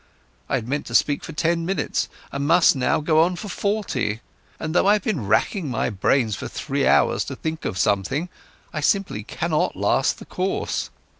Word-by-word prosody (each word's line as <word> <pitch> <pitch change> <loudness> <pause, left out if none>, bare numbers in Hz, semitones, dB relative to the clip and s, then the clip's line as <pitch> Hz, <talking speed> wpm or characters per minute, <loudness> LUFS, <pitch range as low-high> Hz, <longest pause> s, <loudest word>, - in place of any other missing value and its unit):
I - - +1
had 120 -4 -3
meant 145 +3 -2
to - - -4
speak 145 -1 +3
for - - -7
ten 165 +2 0
minutes 190 +3 -1 0.2
and 140 +1 -2
must 170 0 +5
now 130 +3 +1
go 155 +1 +3
on 175 +2 +2
for 200 +4 -7
forty, 180 - -1 0.4
and, 160 0 -3
though 180 - +3
I've 205 -1 +4
been 155 - -2
racking 135 - +1
my 120 0 -1
brains 110 +2 +1
for - - -6
three - - -1
hours - - +3
to - - -5
think 160 0 -4
of 95 - -2
something, 105 - +1 0.5
I 155 - -2
simply 190 - +1
cannot 155 +7 -1
last 100 +7 +1
the - - -11
course. 185 +1 -2
155 Hz, 190 wpm, -23 LUFS, 120-180 Hz, 0.5 s, must